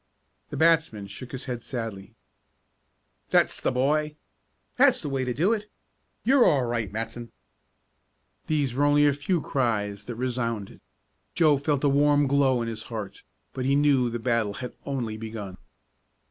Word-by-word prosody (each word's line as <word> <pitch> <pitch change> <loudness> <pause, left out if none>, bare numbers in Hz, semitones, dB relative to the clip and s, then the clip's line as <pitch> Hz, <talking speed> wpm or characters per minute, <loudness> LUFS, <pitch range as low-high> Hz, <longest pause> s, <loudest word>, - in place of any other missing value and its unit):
The - - -6
batsman 160 -10 +2
shook 120 +5 -9
his 130 - -6
head 125 -3 -4
sadly. 115 -6 -6 1.1
"That's - - +2
the - - +1
boy!" 150 +4 +1 0.6
"That's - - +5
the 145 - -3
way 135 -1 -1
to 125 - -1
do 170 - +2
it!" 210 -1 -4 0.5
"You're 260 +1 +5
all 140 - +4
right, 115 -4 -2
Matson!" 115 +2 -5 1.2
These 145 -5 0
were 140 +3 0
only 145 0 +4
a 145 - +4
few 150 +5 -1
cries 105 -7 -1
that 120 - -6
resounded. 115 -4 -3 0.5
Joe 155 -5 +4
felt 145 -1 0
a - - +4
warm 145 +1 +4
glow 135 -3 +2
in - - -4
his 115 -1 -5
heart, 110 -4 -6 0.3
but 130 - -3
he 135 +1 +3
knew 140 -4 +3
the 120 - -3
battle 115 -3 0
had 125 -1 -6
only 120 -6 -3
begun. 110 -4 -7
130 Hz, 160 wpm, -26 LUFS, 115-145 Hz, 1.2 s, That's